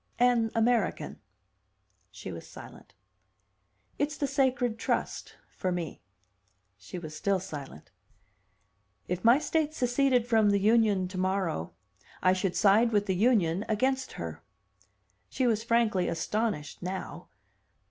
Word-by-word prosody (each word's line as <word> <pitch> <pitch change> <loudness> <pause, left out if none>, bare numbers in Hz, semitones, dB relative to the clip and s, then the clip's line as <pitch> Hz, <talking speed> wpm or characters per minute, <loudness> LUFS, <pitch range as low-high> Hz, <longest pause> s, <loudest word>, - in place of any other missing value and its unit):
"An 240 -2 +3
American." 230 -1 0 0.9
She 100 0 -8
was 85 -2 -9
silent. - - -13 1.0
"It's 295 +1 -1
the 285 - 0
'sacred 255 -4 0
trust' - - -2 0.2
for 185 - -2
me." 175 -4 -4 0.7
She - - -9
was 155 -3 -7
still 195 +4 0
silent. 145 - -9 1.2
"If 180 0 -3
my 235 +3 +7
state 310 0 -1
seceded 250 -1 +2
from 220 -3 +3
the 200 0 +3
Union 210 -3 +3
tomorrow, 185 - -2 0.5
I 185 - +4
should 185 -1 -1
side 220 +3 +4
with 205 -2 +2
the 190 - 0
Union 195 -4 +2
against 260 +4 0
her." 80 -1 -6 0.9
She 260 - -1
was 225 -2 +1
frankly 230 -6 +2
astonished 185 -2 -2
now. 185 +2 -6
210 Hz, 120 wpm, -29 LUFS, 180-240 Hz, 1.2 s, my